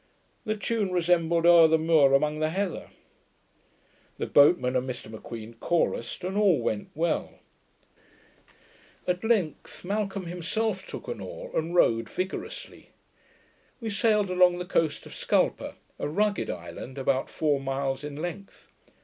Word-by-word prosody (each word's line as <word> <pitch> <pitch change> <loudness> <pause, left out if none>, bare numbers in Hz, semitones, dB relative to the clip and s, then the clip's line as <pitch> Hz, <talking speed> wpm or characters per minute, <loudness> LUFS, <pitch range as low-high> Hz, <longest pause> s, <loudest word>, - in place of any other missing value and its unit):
The 215 0 -1
tune 210 -2 -1
resembled 170 -1 +2
'Owr 170 -1 +8
the 160 0 +4
muir 155 -4 +4
amang 150 +2 +1
the 155 0 +1
heather', 190 +2 -3 1.3
the - - -2
boatmen 140 -3 +4
and 130 +1 0
Mr 125 -3 -6
M'Queen 110 +1 -8
chorused, 170 -3 -1
and 185 +2 -3
all 200 -8 +4
went 110 -3 -2
well. 165 +1 -1 1.7
At 180 +2 -1
length 200 - -1
Malcolm 200 -1 -2
himself 190 +4 -2
took - - -8
an - - -4
oar, - - -8
and 165 +2 -1
rowed 115 -9 +3
vigorously. 190 - -6 0.9
We 225 -3 -4
sailed 210 -1 +2
along 180 -1 +4
the 180 - -4
coast 160 -4 0
of - - -11
Scalpa, - - 0 0.2
a - - -2
rugged 205 +5 0
island, 85 +9 -7
about 135 0 0
four 150 -3 0
miles 135 0 -2
in 145 -1 -6
length. 175 +5 -7
170 Hz, 140 wpm, -27 LUFS, 140-195 Hz, 1.7 s, Owr